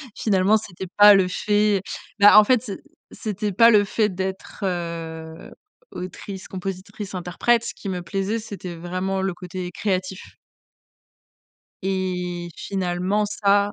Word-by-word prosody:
Finalement 205 0 +3
c'était 190 -3 -8
pas 205 0 +9
le 190 -2 +3
fait 205 +1 +1 0.4
bah 205 +1 +8
en - - +7
fait 250 +1 +3
c'é 205 -6 -6 0.3
c'était 210 -1 -3
pas 230 +5 +6
le 205 -1 +6
fait 210 +1 +1
d'être, 190 +1 -5
heu, 165 -3 -5 0.4
autrice-compositrice-interprète, 190 +3 -3
ce - - -4
qui 200 - -7
me 180 -1 -3
plaisait 195 +5 -2
c'était 195 -5 -7
vraiment 185 +3 -3
le 190 -2 -1
côté 180 0 -6
créatif 190 -2 -2 1.6
et 180 -2 -2
finalement 190 +2 -1
ça 205 0 +2
190 Hz, 120 wpm, -23 LUFS, 180-205 Hz, 1.6 s, pas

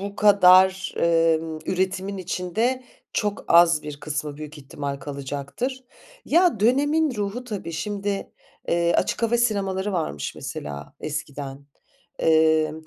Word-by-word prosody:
bu 200 +1 -6
kadar, 190 -2 +5
emm, 165 -1 +2
üretimin 190 +1 -1
içinde 220 +8 -1 0.3
çok 210 -1 -2
az 170 -2 +6
bir 145 -1 -8
kısmı 150 -1 -4
büyük 155 0 -9
ihtimal 140 0 -5
kalacaktır. 145 - -5 0.4
Ya, 335 - +3
dönemin 285 +5 +2
ruhu 210 +4 -3
tabii 200 -8 -5
şimdi, 200 +4 -3 0.4
eee, 170 0 +2
açık - - 0
hava 230 +1 +3
sinemaları 200 -4 0
varmış 75 - -3
mesela 70 0 -7
eskiden. 145 -2 -6 0.6
Eee 160 -1 +4
180 Hz, 115 wpm, -24 LUFS, 155-205 Hz, 0.6 s, az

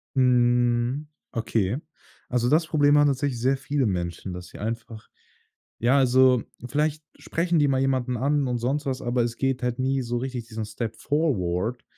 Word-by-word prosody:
Mhm. 120 +1 +2 0.2
Okay. 115 -2 -1 0.5
Also, 120 -1 +1
das 160 +3 +3
Problem 145 -2 +4
haben 145 0 +5
tatsächlich 135 -2 -1
sehr 130 +3 +2
viele 135 0 -1
Menschen, 90 -1 -3
dass 90 0 -8
sie - - -12
einfach 115 0 -5 0.7
ja, 125 +4 +3
also, 130 -2 +4 0.3
vielleicht 150 +2 0 0.2
sprechen 170 0 0
die 145 - +4
mal 135 -1 +1
jemanden 130 -2 0
an 140 +2 +1
und 125 -1 -1
sonst 135 +5 -1
was, 130 0 -2
aber 120 0 0
es 120 0 -2
geht 135 -2 -1
halt 125 0 -1
nie 135 +1 +1
so 120 -1 -3
richtig 125 -2 -4
diesen 110 -1 -5
Step 110 +1 -5
forward, 120 - -1
125 Hz, 170 wpm, -25 LUFS, 115-140 Hz, 0.7 s, haben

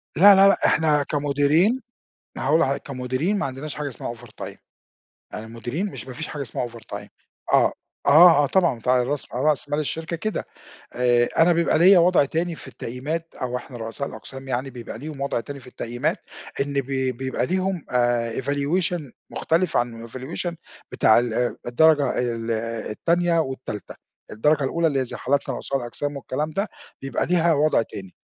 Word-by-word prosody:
لا، 200 +3 +8
لا، 195 +1 +7
لأ، 200 - +4
إحنا 150 -2 +3
كمديرين 145 - +2 0.6
هاقول 150 +5 +2
لحضرتَك، 140 -4 0
كمديرين 130 +8 -1
ما 200 - -1
عندناش 135 +3 -6
حاجة 150 -1 -3
اسمها 120 -2 -6
overtime 115 -2 -10 0.8
يعني 110 +1 -6
المديرين 120 - -4
مش 195 - -7
ما 130 - -7
فيش 155 +3 -5
حاجة 145 - -5
اسمها 120 -1 -3
overtime 115 -1 -9 0.4
آه، - - +5 0.3
آه، 155 0 +8
آه - - +2
طبعًا 175 -2 +2
أنت 115 - -8
على 125 -1 +4
راس 140 +2 -2
على 130 +4 -1
رأس 145 -2 +1
مال 145 +1 -1
الشركة 160 +3 -3
كده، 215 +5 -3 0.5
آآ 120 -1 +3
أنا 170 +2 +6
بيبقى 170 -1 +2
ليَّ 185 +3 +8
وضع 175 -3 +5
تاني 165 +4 -2
في - - -11
التقييمات، 150 +7 -5
أو 125 0 -1
إحنا 125 0 -9
رؤساء 115 +5 -4
الأقسام 135 0 -9
يعني 130 +1 -2
بيبقى 120 -3 -8
ليهم 150 -1 -7
وضع 140 -3 -1
تاني 140 +4 -7
في 130 - -15
التقييمات 120 -1 -2 0.4
إن 140 +1 -2
ب 140 -2 0 0.3
بيبقى 130 0 -2
ليهم 185 -2 -1
آآ 120 -1 +1
evaluation 150 +6 0 0.3
مختلف 170 +3 0
عن 115 -1 -2
evaluation 135 +8 -4 0.4
بتاع 110 +1 +5
ال 120 0 -1
الدرجة 150 +4 +3
ال 115 -2 -2 0.4
التانية 170 +6 +1
والتالتة، 130 -8 -5 0.4
الدرجة 145 +6 +2
الأولى 165 +5 +1
اللي 135 -4 0
زي - - -6
حالتنا 135 -1 0
رؤساء 135 - -2
الأقسام 140 +4 -4
والكلام 145 +3 -3
ده، 195 +7 -2 0.3
بيبقى 135 -2 -1
ليها 170 -1 +3
وضع 150 -3 +3
تاني، 95 -4 -8
140 Hz, 170 wpm, -23 LUFS, 125-165 Hz, 0.8 s, لا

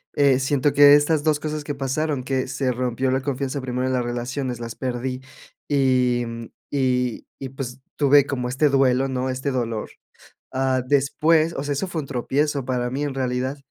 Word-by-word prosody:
eh, 140 -3 +4
siento 140 +1 +1
que 145 0 +8
estas 145 +1 +2
2 155 -1 +2
cosas 155 0 -4
que 145 0 -4
pasaron, 135 +1 -1
que 130 0 -1
se 130 0 -1
rompió 125 +1 -1
la 130 +1 +1
confianza 135 0 -3
primero 125 0 -2
de 130 - 0
las 125 -1 +1
relaciones, 120 +1 -3
las 115 -1 -6
perdí 130 0 -3 0.5
y, 130 -3 +2
mm, 115 0 -6 0.3
y 125 -3 0
y 135 - -5
pues, 130 -1 -6 0.2
tuve 145 -1 +5
como 125 -3 -3
este 135 +4 +2
duelo, 135 -1 +3
¿no? 130 0 -2
Este 130 +2 -2
dolor. 115 -4 -2 0.6
Ah, 130 -1 +1
después, 155 +4 +2
o 135 - -3
sea, 145 - -1
eso 145 +7 -2
fue 170 -2 -3
un - - -9
tropiezo 140 +2 -1
para 125 -1 -1
mí, 135 +3 -3
en 145 -2 -3
realidad, 130 +1 -2
130 Hz, 190 wpm, -23 LUFS, 125-145 Hz, 0.6 s, que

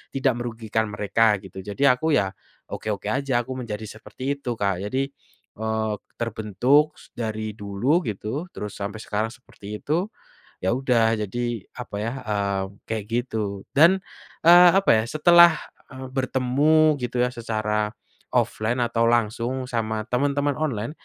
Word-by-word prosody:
tidak 135 -1 +2
merugikan 110 -2 -2
mereka 105 +1 +2
gitu 95 0 -10
jadi 125 +8 +3
aku 155 +4 +1
ya, 95 -1 0 0.4
oke-oke 105 -2 -4
aja 140 0 -1
aku 130 - -8
menjadi 110 -3 -5
seperti 110 +3 -11 0.2
itu 125 - -5
Kak 100 -3 0
jadi, 135 +3 -1 0.5
eee, 110 -1 -1 0.2
terbentuk 120 +7 +2 0.2
dari 110 -2 -3
dulu 105 - 0
gitu 110 - -4
terus 105 -1 -5
sampai 100 +2 -4
sekarang 110 +2 -1
seperti 115 -4 -14 0.2
itu, 170 +7 0 0.5
iya 95 - 0
udah 115 -4 +2
jadi 105 +5 -6 0.4
apa 115 - -8
ya, 115 - -1 0.2
eee, 100 -2 0 0.2
kayak 110 -2 -3
gitu 110 -5 -2
dan, 165 +6 +6 0.5
eee, 175 +1 +9
apa 195 - +4
ya? - - 0
Setelah, 170 +2 +6 0.3
eee, 130 -1 -8
bertemu 140 +4 +3
gitu 125 0 -3
ya 125 - 0
secara 110 -2 -1 0.5
offline 120 +3 +1
atau 115 -1 +1
langsung 120 +2 0
sama 110 -3 -2
temen-temen 145 +3 +1
online, 125 -6 -2
115 Hz, 140 wpm, -24 LUFS, 105-135 Hz, 0.5 s, eee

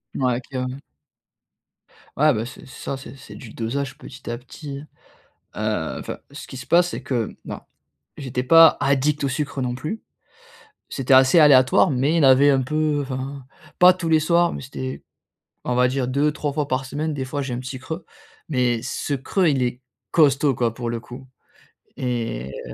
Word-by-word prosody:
Ouais 125 -2 0
clairement. 130 0 -5 1.4
Ouais 150 0 +4
beh 110 +1 -2
c'est 125 - -11
ça 135 +1 -6
c'est 135 -1 -11
c'est 135 - -13
du 110 - -11
dosage 135 +4 -3
petit 135 -2 -11
à 120 - -3
petit 140 +3 -9 0.7
hein. - - -2
Heu, - - -6
enfin - - -6
ce 140 - -9
qui 130 - -10
se 125 - -7
passe 175 +1 +4
c'est - - -6
que, 120 -5 -2
non, - - -6 0.6
j'étais 125 -3 -3
pas 165 +5 +7
addict 140 +1 +1
au - - +1
sucre 140 0 -3
non 125 -1 -2
plus, 155 - -5 0.9
c'était 135 -1 +1
assez 130 +6 +6
aléatoire, 140 +3 +6
mais 140 +5 +1
il 145 - +3
avait 135 +2 +6
un 135 -2 +2
peu 155 +1 0
enfin, 135 0 -5 0.4
pas 180 +1 +9
tous 175 -3 -4
les 160 -1 +4
soirs, 170 +2 +2
mais - - -6
c'était, 130 0 -6 0.6
on 125 - -1
va 125 0 +4
dire 130 0 -1
2-3 145 +2 0
fois 145 0 -2
par 130 +1 -1
semaine. 155 +3 -3
Des 135 -2 -3
fois, 145 +2 -4
j'ai 130 -2 -4
un 120 - -4
petit 130 +1 -6
creux, 160 +6 -7 0.4
mais 125 -5 +1
ce 140 +2 -3
creux 170 +7 0
il 135 -3 +1
est 125 +1 -2 0.3
costaud 145 -3 +3
quoi, 115 -2 0
pour 120 -1 -4
le 115 -1 -3
coup 125 +3 -11 0.7
et 115 - -3 0.2
heu, - - -8
135 Hz, 185 wpm, -22 LUFS, 125-150 Hz, 1.4 s, pas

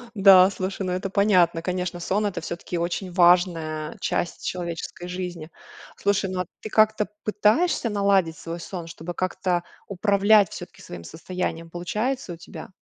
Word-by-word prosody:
Да, 190 -1 +8
слушай, 190 +1 -4
ну, 180 - -2
это 185 +2 -2
понятно. 185 -5 +3
Конечно, 180 0 -3
сон- 200 +5 0
это 180 -4 -2
всё-таки 170 +1 -5
очень 175 +2 -2
важная 170 -4 +2
часть 175 - -2
человеческой 175 0 -5
жизни. 180 -3 -5 0.5
Слушай, 200 -1 0
ну, 185 -1 -2
а 180 - -4 0.2
ты 215 - -6
как-то 215 0 +3 0.2
пытаешься 220 +6 +2
наладить 200 -5 +2
свой 170 +1 -6
сон, 170 -1 -7
чтобы 165 +1 -7
как-то 185 0 -1 0.2
управлять 200 0 +4
всё-таки - - -9
своим 85 -1 -9
состоянием? 165 - -5
Получается 210 +6 -3
у - - -10
тебя? 170 - -10
180 Hz, 150 wpm, -24 LUFS, 170-200 Hz, 0.5 s, Да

